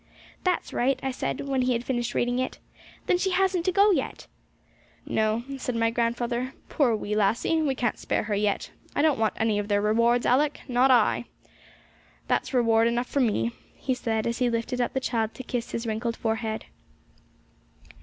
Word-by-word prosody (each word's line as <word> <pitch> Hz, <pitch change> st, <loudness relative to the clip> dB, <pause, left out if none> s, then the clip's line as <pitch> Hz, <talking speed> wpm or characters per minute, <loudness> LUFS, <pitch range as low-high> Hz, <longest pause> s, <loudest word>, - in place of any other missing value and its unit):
'That's 365 Hz, -2 st, 0 dB
right!' 260 Hz, +2 st, +1 dB
I 265 Hz, -, 0 dB
said, 255 Hz, -, -3 dB
when 270 Hz, -2 st, -1 dB
he 250 Hz, 0 st, +2 dB
had 235 Hz, 0 st, -1 dB
finished 240 Hz, -2 st, -2 dB
reading 245 Hz, +1 st, +1 dB
it. 255 Hz, -, -2 dB, 0.5 s
'Then 355 Hz, -, +2 dB
she 380 Hz, -, +1 dB
hasn't 370 Hz, -2 st, +1 dB
to 370 Hz, -, +3 dB
go 400 Hz, +3 st, +5 dB
yet!' 290 Hz, -8 st, -2 dB, 0.8 s
'No,' 220 Hz, +2 st, 0 dB, 0.2 s
said 250 Hz, -1 st, -3 dB
my 230 Hz, 0 st, +2 dB
grandfather; 240 Hz, +2 st, -1 dB
'poor 250 Hz, -7 st, +2 dB
wee 210 Hz, 0 st, -3 dB
lassie! 225 Hz, +10 st, +2 dB
we 280 Hz, -4 st, +1 dB
can't 240 Hz, -3 st, -1 dB
spare -, -, -1 dB
her 210 Hz, 0 st, -3 dB
yet. 205 Hz, 0 st, 0 dB, 0.2 s
I 285 Hz, -, +2 dB
don't 305 Hz, -6 st, +3 dB
want 220 Hz, -1 st, +1 dB
any 220 Hz, -2 st, +1 dB
of 205 Hz, -, -3 dB
their 205 Hz, -1 st, +2 dB
rewards, 230 Hz, +3 st, +2 dB
Alick, 285 Hz, +4 st, +2 dB
not 255 Hz, +1 st, +3 dB
I! 240 Hz, -1 st, +4 dB, 1.0 s
That's -, -, 0 dB
reward 230 Hz, -3 st, +3 dB
enough 240 Hz, +1 st, 0 dB
for 280 Hz, -, 0 dB
me,' 205 Hz, -, +1 dB, 0.2 s
he 265 Hz, -, -1 dB
said, 225 Hz, -3 st, -1 dB
as 235 Hz, 0 st, -1 dB
he 250 Hz, -1 st, +2 dB
lifted 235 Hz, +2 st, -1 dB
up 245 Hz, -, -1 dB
the 265 Hz, -, +1 dB
child 225 Hz, -4 st, -1 dB
to 260 Hz, -, -7 dB
kiss 240 Hz, -1 st, -3 dB
his 230 Hz, -, -4 dB
wrinkled 230 Hz, +1 st, -2 dB
forehead. 220 Hz, -1 st, -2 dB
240 Hz, 185 wpm, -26 LUFS, 225-260 Hz, 1.0 s, go